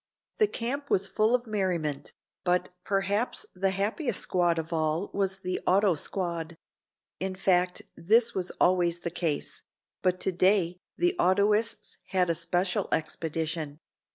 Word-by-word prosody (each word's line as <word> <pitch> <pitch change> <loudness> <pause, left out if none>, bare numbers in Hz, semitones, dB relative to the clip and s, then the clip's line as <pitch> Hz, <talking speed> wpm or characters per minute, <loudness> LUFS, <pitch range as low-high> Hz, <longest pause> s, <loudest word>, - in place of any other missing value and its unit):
The 430 - +5
camp 280 - -3
was 195 +1 +3
full 215 +5 +2
of 245 0 -2
merriment, 180 -9 -2 0.3
but 180 0 +1
perhaps 200 +4 0
the 190 +1 +1
happiest 210 - -1
squad 175 -2 +1
of 165 +1 -3
all 160 +3 0
was 195 -1 -1
the 185 0 -2
auto 195 +1 +4
squad. 170 0 -3 0.6
In 190 0 -2
fact 180 -1 +2
this 225 +7 +3
was 185 -2 -1
always 175 -1 +3
the 170 - -3
case, 160 -4 -2 0.4
but 185 0 +1
today 185 -1 +2 0.2
the 355 +2 +2
autoists 210 - +2
had 180 -2 +2
a - - +2
special 175 +3 0
expedition. 160 -1 -2
185 Hz, 135 wpm, -28 LUFS, 170-200 Hz, 0.6 s, The